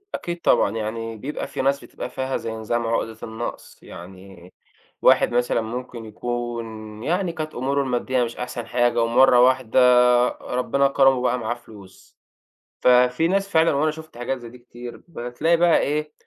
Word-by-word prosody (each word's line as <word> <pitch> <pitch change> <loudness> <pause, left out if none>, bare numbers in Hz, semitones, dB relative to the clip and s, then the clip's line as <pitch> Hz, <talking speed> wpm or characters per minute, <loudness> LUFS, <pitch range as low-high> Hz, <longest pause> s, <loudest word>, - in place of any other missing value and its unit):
أكيد 175 0 -5
طبعًا، - - +3
يعني 115 +1 -4
بيبقى 145 +7 -5
في - - -4
ناس 140 +1 0
بتبقى - - -7
فيها 130 0 -3
زي 115 - -5
نظام 115 +1 -2
عُقدة 115 -1 -2
النقص، 115 +1 -7
يعني 95 0 -13 0.5
واحد - - +4
مثلًا 120 -1 +1
ممكن 120 +1 -6
يكون، 110 -1 -6
يعني 175 +5 -1
كانت 155 -2 -6
أمُوره 140 +3 0
المادّية 125 -1 0
مش 115 - -6
أحسن 125 -1 -5
حاجة، 120 -1 +1
ومرّة 120 +2 +5
واحدة 130 -2 +3 0.5
ربنا 140 +2 -1
كرمه 135 -1 +4
وبقى 125 0 0
معاه 115 0 -2
فلوس. 105 -5 -16 0.6
ففي 125 +5 +4
ناس 195 +2 0
فعلًا، 165 -3 +3
وأنا 155 +3 +1
شُفت 155 -4 -12
حاجات 120 +2 -3
زي 120 -2 -10
دي 125 - -14
كتير، 120 0 -11
بتلاقي 155 +3 -1
بقى 170 0 +4
إيه، 150 +1 -2
125 Hz, 160 wpm, -22 LUFS, 115-140 Hz, 0.6 s, ومرّة